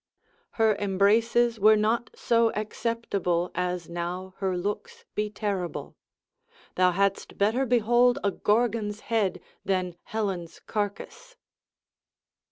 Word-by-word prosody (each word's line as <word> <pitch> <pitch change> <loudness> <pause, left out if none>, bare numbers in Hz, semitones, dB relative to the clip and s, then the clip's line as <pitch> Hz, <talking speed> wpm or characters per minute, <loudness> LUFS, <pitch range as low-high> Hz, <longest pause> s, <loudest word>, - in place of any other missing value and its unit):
Her 220 -2 +3
embraces 225 +4 +2
were 215 +2 +7
not 220 +2 +1
so 230 -1 +2
acceptable, 210 -5 -1
as 180 -1 -2
now 175 +2 -5
her 190 -2 -1
looks 470 - -4
be 210 0 -1
terrible: 200 -5 -4 0.8
thou 185 0 +4
hadst 195 +2 0
better 225 +7 +2
behold 240 +1 +4
a 200 - +2
Gorgon's 215 0 0
head, 200 -5 0 0.2
than 185 -2 -1
Helen's 195 -6 -3
carcass. 215 - -5
210 Hz, 105 wpm, -27 LUFS, 185-230 Hz, 0.8 s, were